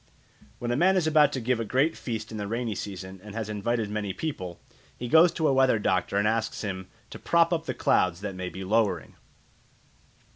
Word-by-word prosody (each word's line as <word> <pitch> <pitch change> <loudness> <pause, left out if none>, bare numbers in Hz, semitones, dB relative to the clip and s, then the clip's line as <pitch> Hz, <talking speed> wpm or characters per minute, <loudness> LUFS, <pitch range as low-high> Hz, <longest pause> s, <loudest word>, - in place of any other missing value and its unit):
When 120 0 -3
a - - +1
man 190 +6 +4
is 175 - +2
about 150 -2 +5
to 130 - -1
give 125 0 0
a - - 0
great 135 +8 +1
feast 115 -2 -5
in 110 - -5
the 100 - -3
rainy 115 +1 -2
season 95 -1 -7
and 105 0 -10
has 110 -2 -3
invited 110 +2 -1
many 105 -2 -2
people, 90 - -5 0.4
he 120 - -5
goes 160 +6 +6
to 160 -2 +1
a - - +3
weather 130 -3 +4
doctor 100 -1 0
and 105 +1 +2
asks 110 0 -1
him 95 -2 -4 0.2
to - - -8
"prop 170 0 +3
up 165 -1 -2
the 130 - -2
clouds 90 -6 +2
that 100 -1 -4
may 90 0 -5
be 95 - -7
lowering." 95 - 0
110 Hz, 215 wpm, -27 LUFS, 100-135 Hz, 0.4 s, goes